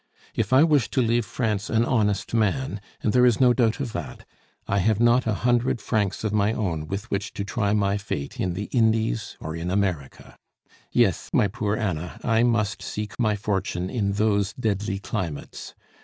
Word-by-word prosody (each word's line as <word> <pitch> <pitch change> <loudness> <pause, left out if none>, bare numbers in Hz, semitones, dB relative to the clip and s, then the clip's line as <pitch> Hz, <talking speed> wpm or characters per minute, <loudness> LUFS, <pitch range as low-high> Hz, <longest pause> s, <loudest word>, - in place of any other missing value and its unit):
If - - -1
I 130 +3 +7
wish 150 -7 +3
to 130 - +1
leave 115 -1 +1
France 110 -4 -2
an 115 +1 +2
honest 105 -4 0
man, 115 0 0 0.2
and 105 - +1
there 125 - +5
is 120 -3 +4
no 125 -2 +5
doubt 120 0 +1
of 130 -5 -4
that, 85 -5 -6 0.4
I 100 - +1
have 110 +2 +2
not 120 +1 +4
a 110 - +2
hundred 120 0 +2
francs 105 -2 -1
of 105 -2 -1
my 105 +1 +2
own 85 -9 -2
with 100 +7 -5
which 100 0 -2
to 100 - -3
try 100 0 -1
my 100 -1 +1
fate 70 -9 -5
in 90 -2 -1
the 100 - -3
Indies 110 - +1
or 80 +1 -5
in 85 +1 -4
America. 90 -8 -3 0.5
Yes, - - +2
my 105 - +4
poor 105 0 -2
Anna, 90 -6 -3
I 115 -1 +2
must 115 -3 +1
seek 105 +2 -5
my 110 -3 +2
fortune 95 -3 -2
in 100 -5 0
those 100 -1 +1
deadly 105 -4 -1
climates. 95 -8 -5
105 Hz, 185 wpm, -24 LUFS, 100-115 Hz, 0.5 s, I